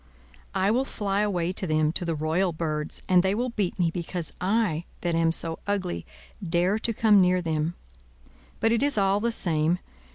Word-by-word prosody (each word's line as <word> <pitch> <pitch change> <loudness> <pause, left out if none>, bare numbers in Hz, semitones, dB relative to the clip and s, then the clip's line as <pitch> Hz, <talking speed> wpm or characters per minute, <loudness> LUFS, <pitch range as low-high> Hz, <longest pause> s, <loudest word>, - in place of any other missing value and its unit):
"I 190 +2 +2
will 250 +4 +2
fly 205 -6 -1
away 180 -4 0
to 190 - -1
them, 155 -1 +2
to 175 - -1
the 165 -1 -1
royal 165 +4 0
birds! 155 -1 -3
and 185 -1 +5
they 190 +2 +1
will 245 +3 -1
beat 205 -6 -2
me, 170 -3 +1
because 170 -1 -4 0.2
I, 175 -7 0 0.2
that 175 -1 -1
am 165 0 +3
so 165 0 -1
ugly, 195 -3 -2 0.4
dare 180 +4 +1
to 230 - +1
come 215 -2 +5
near 180 0 +3
them. 160 -1 -1 0.8
But 225 - +2
it 235 - +2
is 285 -4 +2
all 195 0 +3
the 235 +2 0
same. 165 -4 +1
180 Hz, 190 wpm, -26 LUFS, 165-205 Hz, 0.8 s, and